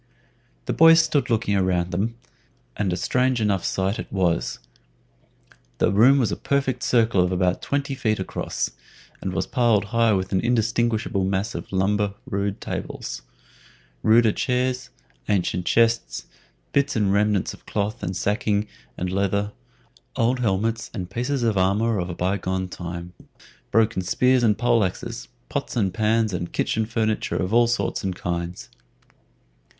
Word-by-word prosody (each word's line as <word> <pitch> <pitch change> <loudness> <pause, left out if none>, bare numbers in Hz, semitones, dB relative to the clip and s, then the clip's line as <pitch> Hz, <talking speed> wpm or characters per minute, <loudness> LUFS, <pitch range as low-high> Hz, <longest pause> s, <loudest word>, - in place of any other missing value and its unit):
The - - -1
boys 165 0 +7
stood 155 -4 +1
looking 110 -3 +1
around 90 -2 +1
them, 105 +6 -1 0.6
and 100 -3 -1
a 90 - -1
strange 125 +6 +1
enough 100 -4 +1
sight 95 +2 -1
it - - -7
was. 90 -4 0 1.2
The - - +2
room 120 +8 +6
was 125 -5 +1
a - - 0
perfect 135 -3 -1
circle 115 -6 +3
of 90 0 +1
about 90 0 +1
twenty 140 0 -2
feet 110 -5 0
across, 95 - -3 0.5
and 95 - -3
was 90 - -1
piled 115 -5 +2
high 115 -1 +4
with 95 -1 -1
an 95 - +2
indistinguishable 115 -3 +1
mass 100 +4 -1
of - - -7
lumber 100 +1 +1
rude 100 0 -2
tables, - - -5 0.8
ruder 110 - +5
chairs, 125 +2 -1 0.4
ancient 90 -3 0
chests, 115 0 +2 0.5
bits 140 -1 +2
and 100 -3 +2
remnants 105 -1 +1
of - - -16
cloth 105 +3 -2
and 90 +1 -3
sacking 105 +1 0 0.3
and 90 0 -2
leather, 100 +2 0 0.6
old 120 +3 +1
helmets 110 0 0
and 90 -3 -5
pieces 125 +4 -1
of 110 -4 +2
armor 105 +4 +2
of 90 0 -3
a 85 - -5
by 95 +3 0
gone 95 0 -2
time, 85 0 -7 0.6
broken 110 -2 +2
spears 125 +7 +2
and 110 -3 +3
pole 120 -2 +3
axes, 95 - -4 0.2
pots - - -4
and 100 -6 +1
pans 110 -1 +1
and 85 -1 -4
kitchen 110 -1 0
furniture 110 -1 -1
of 90 +3 -2
all 120 0 +5
sorts 120 -1 -1
and 95 -2 -2
kinds. 85 -3 -4
105 Hz, 155 wpm, -23 LUFS, 95-120 Hz, 1.2 s, boys